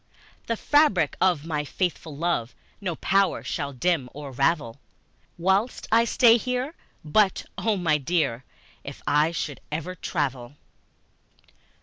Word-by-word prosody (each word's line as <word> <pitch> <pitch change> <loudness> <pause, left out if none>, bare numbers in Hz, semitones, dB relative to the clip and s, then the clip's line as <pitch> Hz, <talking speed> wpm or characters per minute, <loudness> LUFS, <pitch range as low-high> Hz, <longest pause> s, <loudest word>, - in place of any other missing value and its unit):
The 230 - -1
fabric 215 - +3
of 175 -5 +2
my 150 -3 -2
faithful 160 -1 -3
love 160 -8 -1 0.3
No 180 -4 -2
power 195 +3 +1
shall 140 - -3
dim 140 -1 0
or 145 -1 -7
ravel 135 -2 0 0.6
Whilst 190 +7 0
I 230 +1 +5
stay 235 0 +5
here, 250 +5 -2 0.3
but 190 +5 +2
oh, 205 +2 0
my 165 -4 +2
dear, 140 -5 0 0.4
If 140 - -9
I 150 +2 +3
should 170 - -4
ever 165 +4 -3
travel! 140 -7 -3
170 Hz, 125 wpm, -25 LUFS, 145-195 Hz, 0.6 s, I